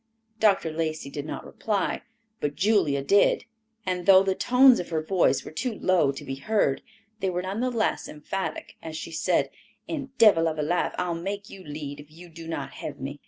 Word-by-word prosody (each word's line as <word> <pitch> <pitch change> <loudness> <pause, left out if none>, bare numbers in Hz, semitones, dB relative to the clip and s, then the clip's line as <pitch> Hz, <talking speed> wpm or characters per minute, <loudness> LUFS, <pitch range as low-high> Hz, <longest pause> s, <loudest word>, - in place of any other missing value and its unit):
Dr. 195 -6 +3
Lacey 155 -3 -3
did 145 +1 -5
not - - -6
reply, 205 -3 -2 0.4
but 145 0 -2
Julia 185 -10 +2
did; 200 +9 +3 0.4
and 180 -2 -2
though 190 -1 +8
the 195 -1 +1
tones 250 +5 +5
of 175 - -5
her 160 -2 -1
voice 180 +3 +2
were - - -8
too 230 +8 -3
low 170 -7 +3
to 140 - -9
be 135 - -4
heard, 140 -4 +1 0.4
they 190 - 0
were 180 0 -2
none 195 +3 -3
the 255 +1 +1
less 230 -4 -1
emphatic, 190 +6 -5
as 160 -1 -6
she - - -6
said, 160 - +1 0.4
"And 275 -4 -5
devil 200 -8 +6
of 155 -1 -2
a 150 - 0
life 175 +4 0
I'll 180 -1 -1
make 200 +4 -5
you 190 - -10
lead 145 -2 -6
if 145 0 -12
you 170 +3 -13
do 165 0 -10
not 145 -4 -4
have - - -6
me." 140 +2 -6
175 Hz, 205 wpm, -26 LUFS, 155-200 Hz, 0.4 s, though